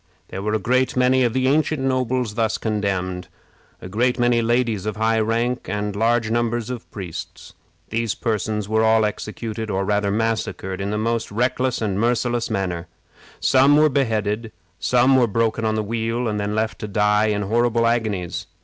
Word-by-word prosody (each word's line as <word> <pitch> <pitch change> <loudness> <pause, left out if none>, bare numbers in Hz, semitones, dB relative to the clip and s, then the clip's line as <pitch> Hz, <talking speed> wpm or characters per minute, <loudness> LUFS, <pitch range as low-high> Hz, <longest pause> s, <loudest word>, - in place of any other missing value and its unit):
There 95 - -5
were 105 +2 -1
a - - +3
great 130 +3 +1
many 130 +1 +4
of 120 - +2
the 130 +2 +1
ancient 155 +2 +2
nobles 130 -3 0
thus 110 -1 0
condemned, 95 -4 -2 0.6
a - - -6
great 120 +6 +1
many 120 -1 +3
ladies 115 -3 0
of 105 - -2
high 110 +1 +1
rank, 115 +3 -1
and 105 -1 -2
large 115 +1 +1
numbers 120 0 -1
of 125 -2 -7
priests. 90 -6 -8 0.4
These 115 -1 -1
persons 105 -2 -2
were 110 +1 +2
all 110 0 +4
executed, 110 +1 -4
or 95 -1 -1
rather 105 0 +1
massacred, 105 -3 -2
in 100 - -2
the 105 - -1
most 115 +1 -1
reckless 125 +2 0
and 100 -2 -1
merciless 120 +1 0
manner. 90 -3 -2 0.5
Some 135 +2 +5
were 155 0 +5
beheaded; 110 -4 -1 0.3
some 125 +2 +4
were 125 -2 +4
broken 115 +1 0
on 110 0 +1
the 110 - 0
wheel, 115 +2 -2
and 105 -1 -1
then 105 +1 -2
left 110 0 -1
to 105 - -5
die 105 +1 +2
in 105 -1 0
horrible 115 +2 +1
agonies. 110 -7 -1
110 Hz, 175 wpm, -22 LUFS, 105-120 Hz, 0.6 s, Some